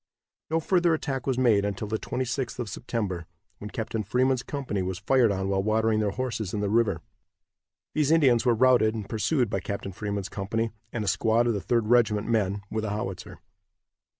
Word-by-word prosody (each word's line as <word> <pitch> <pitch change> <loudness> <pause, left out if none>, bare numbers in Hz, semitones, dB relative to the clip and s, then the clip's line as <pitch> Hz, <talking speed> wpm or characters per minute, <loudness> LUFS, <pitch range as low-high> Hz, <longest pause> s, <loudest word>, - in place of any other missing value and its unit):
No 160 +1 +2
further 175 0 +2
attack 135 -4 -4
was 130 -2 +1
made 115 -6 +4
until 100 +1 -3
the 110 +1 -2
26th 130 0 -3
of 120 -3 -3
September, 95 -7 -3 0.3
when 105 - -7
Captain 110 -1 -3
Freeman's 125 +4 +1
company 130 -8 -3
was 95 0 -3
fired 120 +4 +3
on 95 -1 -1
while 95 0 +1
watering 110 +1 +2
their 105 -1 +1
horses 110 -3 -3
in - - -1
the 100 -1 -1
river. 110 -7 +2 0.9
These 150 -2 +1
Indians 135 -8 +4
were 120 -2 +3
routed 120 -2 +4
and 105 -3 -5
pursued 120 +4 +1
by - - -2
Captain 100 -1 -5
Freeman's 100 0 -4
company, 110 +3 -2 0.2
and 115 - -3
a - - -6
squad 115 +4 +2
of 120 - +2
the 100 - -2
Third 115 +5 +1
Regiment 110 -2 +3
men, 100 -3 0
with 110 0 -2
a 110 - -2
howitzer. 95 -3 -5
110 Hz, 190 wpm, -27 LUFS, 100-125 Hz, 0.9 s, made